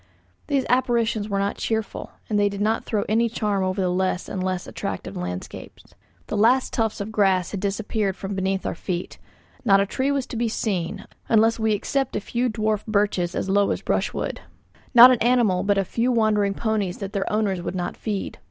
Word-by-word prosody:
These 275 Hz, -2 st, +1 dB
apparitions 235 Hz, -4 st, +1 dB
were 200 Hz, -, -1 dB
not 200 Hz, +1 st, -1 dB
cheerful, 220 Hz, -2 st, -3 dB, 0.2 s
and 210 Hz, -1 st, +1 dB
did 200 Hz, -1 st, +1 dB
not 220 Hz, +2 st, 0 dB
throw 210 Hz, -3 st, 0 dB
any 230 Hz, +2 st, +2 dB
charm 210 Hz, -4 st, -1 dB
over 185 Hz, +1 st, -1 dB
the 185 Hz, -, +1 dB
less 185 Hz, 0 st, -1 dB
and 190 Hz, -, -4 dB
less 185 Hz, -1 st, -2 dB
attractive -, -, -5 dB
landscapes. 90 Hz, 0 st, -7 dB, 0.3 s
The -, -, -4 dB
last 240 Hz, +5 st, +3 dB
tufts 225 Hz, -3 st, -1 dB
of 205 Hz, +2 st, -5 dB
grass 190 Hz, -4 st, +2 dB
had 200 Hz, -, -3 dB
disappeared 200 Hz, 0 st, -1 dB
from 195 Hz, +1 st, -5 dB
beneath 190 Hz, 0 st, -1 dB
our -, -, -1 dB
feet. 175 Hz, +1 st, -5 dB, 0.4 s
Not 195 Hz, -5 st, +5 dB
a 200 Hz, -, +2 dB
tree 260 Hz, +7 st, -1 dB
was 280 Hz, -2 st, 0 dB
to -, -, -8 dB
be 230 Hz, 0 st, 0 dB
seen, 190 Hz, -6 st, -2 dB, 0.2 s
unless 225 Hz, +1 st, +4 dB
we 220 Hz, -1 st, +2 dB
except 270 Hz, +6 st, -1 dB
a -, -, +1 dB
few 240 Hz, +4 st, -1 dB
dwarf 215 Hz, -2 st, -1 dB
birches 205 Hz, -4 st, 0 dB
as -, -, -2 dB
low 200 Hz, +1 st, +3 dB
as -, -, -2 dB
brushwood. -, -, -2 dB, 0.5 s
Not 245 Hz, +2 st, +11 dB
an 250 Hz, -, +2 dB
animal 235 Hz, -7 st, +3 dB
but 200 Hz, +1 st, +1 dB
a 195 Hz, -, +1 dB
few 240 Hz, +6 st, 0 dB
wandering 210 Hz, -4 st, +2 dB
ponies 215 Hz, -5 st, -1 dB
that 195 Hz, 0 st, -6 dB
their 200 Hz, -2 st, -2 dB
owners 205 Hz, -4 st, 0 dB
would 180 Hz, -, -4 dB
not 175 Hz, -1 st, -3 dB
feed. 210 Hz, -3 st, -4 dB
210 Hz, 200 wpm, -23 LUFS, 195-225 Hz, 0.5 s, Not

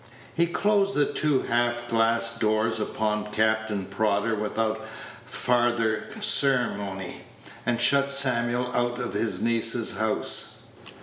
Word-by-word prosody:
He 170 Hz, +1 st, +2 dB
closed 200 Hz, +2 st, +1 dB
the 145 Hz, -, +3 dB
two 150 Hz, -4 st, +1 dB
half 120 Hz, 0 st, -1 dB
glass 115 Hz, 0 st, +1 dB
doors 110 Hz, 0 st, 0 dB
upon 105 Hz, 0 st, -2 dB
Captain 110 Hz, -2 st, 0 dB
Prodder 110 Hz, +2 st, -1 dB
without 110 Hz, +1 st, -2 dB, 0.4 s
farther 120 Hz, -3 st, 0 dB
ceremony, 110 Hz, -, +1 dB, 0.5 s
and 120 Hz, -1 st, 0 dB
shut 140 Hz, +3 st, +3 dB
Samuel 125 Hz, -2 st, +1 dB
out 120 Hz, 0 st, -1 dB
of 120 Hz, -5 st, -5 dB
his 105 Hz, +2 st, -2 dB
niece's 115 Hz, -1 st, +1 dB
house. 110 Hz, -1 st, +1 dB
115 Hz, 115 wpm, -25 LUFS, 110-125 Hz, 0.5 s, the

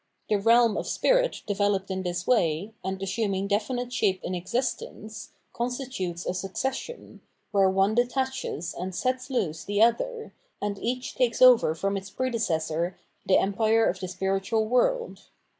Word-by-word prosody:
The 210 Hz, -, +2 dB
realm 230 Hz, +2 st, +4 dB
of -, -, -3 dB
spirits -, -, +2 dB
developed 205 Hz, -1 st, 0 dB
in 190 Hz, 0 st, -2 dB
this 175 Hz, -1 st, -3 dB
way, 190 Hz, -3 st, +1 dB
and 190 Hz, 0 st, -3 dB
assiiTniug 195 Hz, 0 st, -1 dB
definite 245 Hz, +4 st, -1 dB
shape 190 Hz, -6 st, +1 dB
in 185 Hz, -, -3 dB
existence, 215 Hz, +2 st, -4 dB, 0.2 s
constitutes 240 Hz, -8 st, -3 dB
a -, -, -1 dB
succession, 265 Hz, -, -4 dB, 0.3 s
where 195 Hz, -2 st, +4 dB
one 195 Hz, +2 st, +2 dB
detaches 245 Hz, -, -1 dB
and 185 Hz, +1 st, -5 dB
sets 255 Hz, +4 st, -1 dB
loose 165 Hz, -, -1 dB
the 205 Hz, +2 st, +2 dB
other, 470 Hz, -, 0 dB, 0.3 s
and 205 Hz, -1 st, -3 dB
each 250 Hz, +2 st, -3 dB
takes 240 Hz, -3 st, +1 dB
over 250 Hz, -10 st, +6 dB
from 195 Hz, +4 st, -1 dB
its 195 Hz, 0 st, -7 dB
predecessor 175 Hz, -8 st, -1 dB, 0.3 s
the 190 Hz, -, +5 dB
empire 220 Hz, +3 st, +2 dB
of 180 Hz, -, -1 dB
the 185 Hz, -, -4 dB
spiritual 195 Hz, +4 st, 0 dB
world. 475 Hz, -, 0 dB
205 Hz, 145 wpm, -27 LUFS, 190-245 Hz, 0.3 s, over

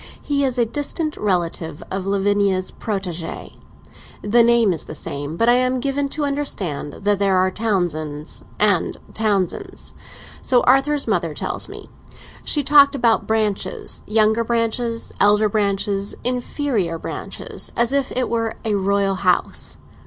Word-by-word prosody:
He 280 Hz, -1 st, 0 dB
is 260 Hz, -2 st, 0 dB
a 240 Hz, -, +3 dB
distant 295 Hz, +5 st, -3 dB
relation 170 Hz, -5 st, -1 dB
of 190 Hz, 0 st, -3 dB
Lavinia's 200 Hz, -1 st, +1 dB
protégé. 185 Hz, -6 st, -5 dB, 0.7 s
The 230 Hz, +3 st, +4 dB
name 235 Hz, -4 st, +4 dB
is 165 Hz, -, -5 dB
the 155 Hz, -, -8 dB
same, 145 Hz, +2 st, -5 dB
but 230 Hz, -, +2 dB
I 240 Hz, -, +7 dB
am 255 Hz, +1 st, +2 dB
given 280 Hz, +2 st, -1 dB
to 295 Hz, +1 st, -2 dB
understand 200 Hz, -, -3 dB
that 205 Hz, -1 st, +2 dB
there 195 Hz, -2 st, +3 dB
are 185 Hz, 0 st, +3 dB
Townsends 170 Hz, -8 st, -2 dB, 0.2 s
and 205 Hz, -4 st, +2 dB, 0.2 s
Townsends. 205 Hz, -5 st, -2 dB, 0.5 s
So 250 Hz, -2 st, +4 dB
Arthur's 275 Hz, +3 st, +3 dB
mother -, -, 0 dB
tells -, -, -3 dB
me; -, -, -9 dB, 0.6 s
she 295 Hz, -, 0 dB
talked 280 Hz, 0 st, +6 dB
about 235 Hz, -4 st, +2 dB
'branches'—younger 220 Hz, +1 st, 0 dB
branches, 230 Hz, 0 st, -1 dB
elder 210 Hz, +1 st, +4 dB
branches, 200 Hz, -1 st, 0 dB
inferior 245 Hz, -, -1 dB
branches—as 235 Hz, +8 st, -3 dB
if 280 Hz, -2 st, 0 dB
it 255 Hz, 0 st, 0 dB
were 230 Hz, -1 st, -1 dB
a 215 Hz, -, +1 dB
royal 200 Hz, 0 st, +1 dB
house. 180 Hz, -2 st, 0 dB
215 Hz, 135 wpm, -21 LUFS, 195-245 Hz, 0.7 s, I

